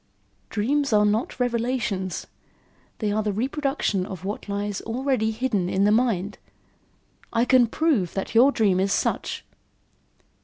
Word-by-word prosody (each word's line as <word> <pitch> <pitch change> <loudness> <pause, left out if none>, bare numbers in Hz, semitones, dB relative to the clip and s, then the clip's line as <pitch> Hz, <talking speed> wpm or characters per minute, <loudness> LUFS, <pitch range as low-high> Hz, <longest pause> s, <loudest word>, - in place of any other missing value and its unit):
"Dreams 275 +6 0
are 210 0 +5
not 215 +5 0
revelations; 235 -6 -1 0.7
they 210 -2 -1
are 215 +1 +1
the 210 -1 -1
reproduction 265 -3 -1
of 190 -2 -7
what 205 +1 -5
already 220 +5 -1
lies 220 0 -3
hidden 215 -8 0
in 190 - +1
the 205 - +4
mind. 215 -4 +1 0.9
I 230 +1 +2
can 255 -2 +5
prove 235 - 0
that 195 - -3
your 250 +5 +6
dream 200 -8 +2
is 195 +1 +1
such." - - -1
220 Hz, 140 wpm, -24 LUFS, 200-250 Hz, 0.9 s, your